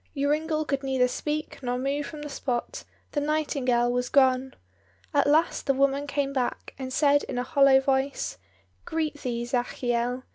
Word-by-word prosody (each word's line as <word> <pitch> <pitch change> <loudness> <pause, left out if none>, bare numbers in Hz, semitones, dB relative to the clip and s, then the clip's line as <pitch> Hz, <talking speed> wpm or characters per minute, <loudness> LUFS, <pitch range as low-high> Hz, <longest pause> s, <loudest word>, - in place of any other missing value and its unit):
Joringel 305 +2 0
could 275 -1 -1
neither 265 -2 +2
speak 300 +4 -4
nor 245 -1 -1
move 280 +3 -2
from 300 -2 -8
the - - -5
spot; 270 - -3 0.3
the 290 - 0
nightingale 275 -5 +1
was 250 0 -1
gone. 265 -1 +3 0.6
At - - +3
last 315 +4 +2
the 275 - +3
woman 275 +1 +1
came 280 -1 -1
back, 255 -3 -2
and 260 -1 -5
said 285 +1 +4
in - - -5
a 245 - 0
hollow 270 +1 +5
voice, 270 - -1 0.4
"Greet 310 -2 -3
thee, 235 -1 -2
Zachiel. 245 0 -1
275 Hz, 160 wpm, -26 LUFS, 250-290 Hz, 0.6 s, hollow